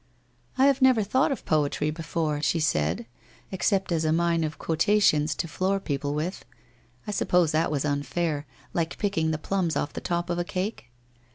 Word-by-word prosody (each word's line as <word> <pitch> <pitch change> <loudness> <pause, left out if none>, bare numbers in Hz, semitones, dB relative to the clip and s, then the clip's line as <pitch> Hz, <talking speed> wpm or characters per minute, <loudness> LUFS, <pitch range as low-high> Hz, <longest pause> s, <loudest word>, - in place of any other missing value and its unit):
' 120 0 -35
I 265 - +5
have 275 -1 +3
never 255 -4 +5
thought 260 +9 +2
of 270 - -4
poetry 150 0 +1
before/ 155 -2 -2
she 165 - +1
said, 85 - 0 0.2
' - - -29
ex 190 - 0
cept 195 -3 +1
as 165 -1 +1
a 155 - +2
mine 170 0 +2
of 155 -1 -3
quotations 160 -3 +2
to 170 - -3
floor 190 +4 0
people 145 -4 -2
with. 165 +5 -3 0.6
I - - -3
sup 205 - -1
pose 175 -3 +3
that 160 +1 +1
was 145 -1 -1
unfair, 150 +1 -1 0.3
like 165 -1 -1
picking 195 -6 0
the 155 - 0
plums 175 0 -1
off 145 - -2
the - - -5
top 175 0 -2
of 175 - -1
a - - +1
cake 185 - -4
165 Hz, 200 wpm, -26 LUFS, 150-190 Hz, 0.6 s, I